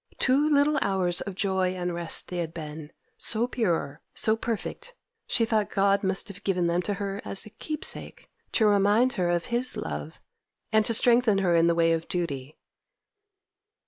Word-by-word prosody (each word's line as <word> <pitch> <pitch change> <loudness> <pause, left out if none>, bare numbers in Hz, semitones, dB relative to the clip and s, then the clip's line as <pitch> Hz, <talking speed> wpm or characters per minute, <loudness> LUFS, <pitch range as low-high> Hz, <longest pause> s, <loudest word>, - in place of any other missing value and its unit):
Two 280 +4 +2
little 290 0 +3
hours 185 -3 0
of 200 - -6
joy 190 -1 0
and 180 -1 -3
rest 170 -1 0
they 180 - -4
had 165 -1 -4
been, 155 -1 -7 0.3
so 230 +1 +2
pure, 170 - -2
so 220 - +2
perfect, 235 - -5 0.3
she 230 - +2
thought 220 -2 0
God 200 0 +2
must 190 0 -1
have 200 -1 -10
given 180 -3 0
them 170 +1 +1
to 205 +2 -3
her 200 0 -4
as 195 - -3
a 215 - -12
keepsake, 305 +7 -5 0.3
to 220 - +3
remind 210 +5 +3
her 180 -6 0
of 175 -1 0
His 245 +2 0
love, 75 0 -6 0.5
and 220 0 +4
to 230 - +6
strengthen 235 -2 +4
her 185 -3 +2
in 165 0 +4
the 170 - +2
way 165 0 +3
of 165 0 -3
duty. 150 -5 -4
195 Hz, 175 wpm, -26 LUFS, 170-225 Hz, 0.5 s, to